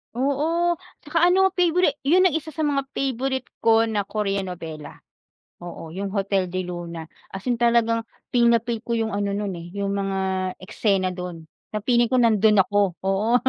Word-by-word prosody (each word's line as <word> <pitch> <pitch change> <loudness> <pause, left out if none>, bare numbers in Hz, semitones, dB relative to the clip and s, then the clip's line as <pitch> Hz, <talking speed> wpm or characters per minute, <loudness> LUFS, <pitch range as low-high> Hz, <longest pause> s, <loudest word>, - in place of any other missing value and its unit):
Oo 320 +6 +1 0.2
tsaka 330 +3 +2
ano 380 +1 +4
peyborit 355 -4 +2
yun 365 +4 +5
ang 370 - +5
isa 310 - -19
sa 315 0 -3
mga 275 -2 0
peyborit 265 0 -1 0.2
ko 225 0 +4
na 210 -3 -1
Koreanovela. 180 -7 -4 0.6
Oo 170 -2 -9
yung 195 +3 -5
Hotel 195 -2 +1
del 180 0 -4
Luna 170 -2 -7 0.2
as 195 - -5
in 240 - 0
talagang 230 -1 +2 0.2
feel 240 -1 +3
na 235 -1 +4
feel 235 -1 -2
ko 235 - 0
yung 225 -1 0
ano 200 0 -1
nun 200 -3 -3
eh, 170 - -9
yung 200 0 -2
mga 195 -1 -1 0.4
eksena 190 -1 0
dun 180 -2 -6 0.3
na 210 - -2
feeling 240 -1 +3
ko 255 - +1
nandun 215 -2 +4
ako. 205 -2 +1
Oo. 195 +5 +1
220 Hz, 175 wpm, -23 LUFS, 195-265 Hz, 0.6 s, yun